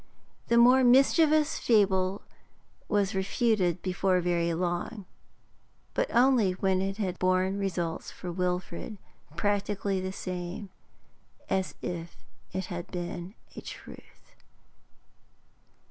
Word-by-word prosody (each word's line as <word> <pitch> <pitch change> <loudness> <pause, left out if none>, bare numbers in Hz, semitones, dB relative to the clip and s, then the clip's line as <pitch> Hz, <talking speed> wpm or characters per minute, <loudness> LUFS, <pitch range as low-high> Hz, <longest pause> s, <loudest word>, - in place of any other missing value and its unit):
The 235 - +3
more 250 +2 +7
mischievous 300 +4 +4
fable 195 -3 +2 0.7
was 200 0 +1
refuted 190 -2 +1
before 185 0 +1
very 170 -1 +1
long, 180 +4 -3 0.9
but - - 0
only 240 -6 +4
when 190 0 +1
it 195 +1 -2
had 185 -4 -2
borne 185 +2 +1
results 175 -4 -2
for 180 - -7
Wilfrid 180 +3 -3 0.4
practically 200 0 0
the 185 0 -3
same 185 +1 -6 0.8
as 190 -1 0
if 170 -1 -5 0.3
it 190 +1 -3
had 175 -1 -6
been 175 +2 -5 0.2
a - - -7
truth. - - -12
190 Hz, 105 wpm, -28 LUFS, 180-210 Hz, 0.9 s, more